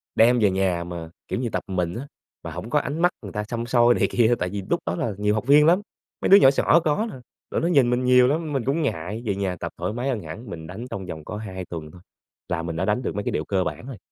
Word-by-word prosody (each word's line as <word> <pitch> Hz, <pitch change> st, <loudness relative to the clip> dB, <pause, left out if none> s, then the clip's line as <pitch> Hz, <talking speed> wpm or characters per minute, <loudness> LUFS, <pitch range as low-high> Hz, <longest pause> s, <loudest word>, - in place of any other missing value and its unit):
đem 120 Hz, +2 st, +5 dB
về 105 Hz, -3 st, +4 dB
nhà 95 Hz, -2 st, 0 dB
mà, 85 Hz, -2 st, -7 dB, 0.2 s
kiểu -, -, -2 dB
như, 120 Hz, -2 st, -1 dB
tập -, -, -3 dB
một 95 Hz, -, -6 dB
mình 90 Hz, 0 st, -1 dB
á, 135 Hz, +4 st, -6 dB, 0.4 s
mà -, -, -6 dB
hổng -, -, -7 dB
có -, -, +3 dB
ánh 145 Hz, +5 st, -4 dB
mắt 175 Hz, +1 st, +4 dB
người 100 Hz, -, -7 dB
ta 105 Hz, -, -3 dB
săm 115 Hz, +2 st, -4 dB
soi 120 Hz, 0 st, +4 dB
này -, -, +2 dB
kia, 120 Hz, 0 st, +3 dB
tại 90 Hz, -, -1 dB
vì 100 Hz, +1 st, -4 dB
lúc -, -, +2 dB
đó 85 Hz, +2 st, -1 dB
là 110 Hz, -, -2 dB
nhiều 105 Hz, 0 st, +1 dB
học 110 Hz, +4 st, -3 dB
viên 150 Hz, +1 st, +7 dB
lắm, 175 Hz, +5 st, +4 dB, 0.4 s
mấy -, -, 0 dB
đứa 200 Hz, -, +10 dB
nhỏ 135 Hz, -, +7 dB
xỏ 150 Hz, +4 st, +4 dB
có 155 Hz, +10 st, +1 dB
nè, -, -, -9 dB, 0.4 s
rồi -, -, 0 dB
nó 165 Hz, -, +1 dB
nhìn 140 Hz, -8 st, +4 dB
mình 125 Hz, +1 st, +1 dB
nhiều 125 Hz, 0 st, +6 dB
lắm 155 Hz, +2 st, -1 dB
mình 135 Hz, -3 st, 0 dB
cũng 140 Hz, +5 st, +1 dB
ngại, 105 Hz, -, -3 dB
về 100 Hz, -3 st, 0 dB
nhà 95 Hz, -2 st, -2 dB
tập -, -, -4 dB
thoải 105 Hz, -, -3 dB
mái 125 Hz, +4 st, -2 dB
hơn 115 Hz, -5 st, -1 dB
hẳn, 100 Hz, +8 st, -9 dB
mình 80 Hz, -3 st, -7 dB
đánh 100 Hz, +8 st, -7 dB
trong 95 Hz, -5 st, -5 dB
vòng 80 Hz, -4 st, -7 dB
có 105 Hz, -, -5 dB
2 95 Hz, -4 st, -6 dB
tuần 80 Hz, -3 st, -7 dB
thôi, 90 Hz, -, -15 dB, 0.5 s
là 85 Hz, -2 st, -1 dB
mình 85 Hz, -1 st, -4 dB
đã 90 Hz, +3 st, -1 dB
đánh 105 Hz, +4 st, +1 dB
được -, -, -3 dB
mấy 105 Hz, -, -2 dB
cái -, -, -2 dB
điệu -, -, -2 dB
cơ 95 Hz, -2 st, 0 dB
bản 115 Hz, -, -5 dB
rồi. 130 Hz, -6 st, -7 dB
110 Hz, 300 wpm, -24 LUFS, 95-130 Hz, 0.5 s, đứa